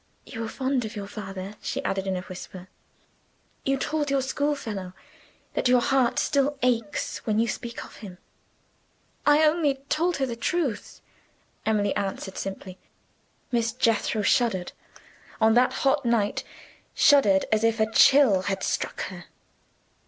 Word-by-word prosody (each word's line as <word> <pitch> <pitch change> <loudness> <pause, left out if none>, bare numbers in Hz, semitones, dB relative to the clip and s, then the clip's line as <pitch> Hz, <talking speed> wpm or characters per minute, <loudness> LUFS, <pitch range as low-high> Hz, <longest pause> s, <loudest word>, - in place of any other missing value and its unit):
"You 225 - -7
were 225 - -3
fond 260 -1 -1
of 220 +1 -6
your 205 -1 -5
father?" 195 0 -7
she - - -3
added, 195 0 -2
in 190 - 0
a - - -4
whisper. 185 0 -10 0.9
"You 275 0 +1
told 300 +1 -1
your 275 -1 +1
schoolfellow 255 -10 -3 0.6
that - - 0
your 250 0 +5
heart 255 -1 +2
still 280 +1 +1
aches 230 -5 0
when 215 -1 +1
you 230 +1 +2
speak 235 +1 -5
of - - -15
him." 190 -4 -10 1.1
"I 295 +1 +6
only 305 -3 +2
told 345 +3 +1
her 270 - 0
the 240 -3 -4
truth," 260 - -2 0.7
Emily 205 -2 +1
answered 195 -1 -4
simply. 190 -1 -6 0.7
Miss 230 -2 0
Jethro 225 -3 +1
shuddered 200 -6 +1 0.7
on 220 0 +4
that 250 +2 +4
hot 275 +1 +3
night! 230 -4 +1 0.5
shuddered 210 -10 +5
as 215 0 +2
if 225 0 +2
a 220 0 +1
chill 255 -6 +6
had 195 -1 -2
struck - - -2
her. - - -10
230 Hz, 145 wpm, -26 LUFS, 200-270 Hz, 1.1 s, I